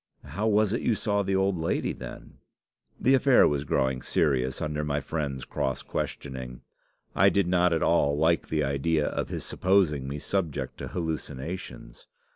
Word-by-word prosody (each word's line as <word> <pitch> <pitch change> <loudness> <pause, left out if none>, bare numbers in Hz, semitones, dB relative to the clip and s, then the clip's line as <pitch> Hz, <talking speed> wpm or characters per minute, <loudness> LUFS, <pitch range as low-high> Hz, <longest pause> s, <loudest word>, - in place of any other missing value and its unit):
"'How 105 +2 -3
was 105 -1 +3
it 115 - -1
you 115 - +1
saw 100 -1 0
the 95 -1 0
old 95 0 +2
lady, 80 0 -1
then?' - - -10 0.6
"The 130 - +3
affair 135 -1 +5
was 70 0 -1
growing 65 -2 0
serious 65 -4 0
under 75 0 -2
my 75 -1 -1
friend's 75 -2 -4
cross 65 -1 -2
questioning. 65 -3 -5 0.5
I 100 +2 +6
did 100 -1 +2
not 90 0 +3
at 80 - +1
all 70 -4 +3
like 80 +2 +2
the 75 -1 +1
idea 75 +3 +1
of - - -3
his - - -4
supposing 90 -8 +1
me 70 +2 -4
subject 75 -6 -3
to - - -5
hallucinations. 80 -5 -6
80 Hz, 165 wpm, -27 LUFS, 70-95 Hz, 0.6 s, I